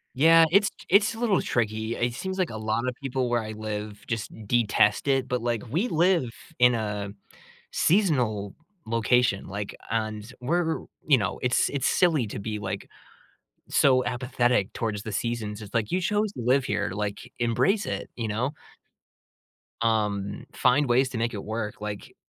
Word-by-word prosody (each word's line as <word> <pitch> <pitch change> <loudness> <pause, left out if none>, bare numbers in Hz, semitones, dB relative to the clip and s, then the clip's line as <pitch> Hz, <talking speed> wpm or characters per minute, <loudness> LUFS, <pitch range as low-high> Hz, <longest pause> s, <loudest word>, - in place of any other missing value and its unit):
Yeah, 165 +4 +7
it's 200 +3 +5 0.2
it's 205 +4 +4
a - - -9
little 220 -6 +2
tricky. 110 0 -1
It 120 0 0
seems 190 +9 -4
like 185 -3 +1
a 110 - -6
lot 110 +2 -1
of 125 - 0
people 130 -2 -1
where 120 -1 +1
I 110 0 -6
live 105 -1 -6
just 115 -3 -3 0.2
detest 105 0 +2
it, 135 -2 +2
but, 125 -2 -1
like, 120 -2 -1
we 190 - +1
live 170 - +2 0.3
in 125 0 +6
a 105 -3 -3 0.6
seasonal 125 - +2 0.3
location, 115 -1 +2
like, 100 +1 -5 0.2
and 110 0 -3
we're 165 +5 0 0.3
you 140 -4 +6
know, 105 -1 -2
it's 125 0 +2
it's 140 -2 0
silly 160 -10 +3
to 100 - -6
be, 105 +1 -4
like, 95 -2 -5 0.8
so 130 -2 +4
apathetic 125 -4 0
towards 105 -3 -3
the 110 - -5
seasons. 110 -1 -3
It's, 105 - -10
like, 115 -3 0
"You 185 - +1
chose 210 +2 0
to - - -6
live 130 +3 +2
here, 105 -5 -1
like, 105 +4 -4
embrace 125 - +2
it," - - -4
you 115 - -2
know? 115 +6 -1 1.3
Um, 105 -3 0
find 135 +2 +3
ways 130 +2 +3
to 125 - -5
make 115 +1 -1
it 100 - -5
work, 110 -1 -4
like 105 -1 -6
120 Hz, 170 wpm, -26 LUFS, 105-135 Hz, 1.3 s, Yeah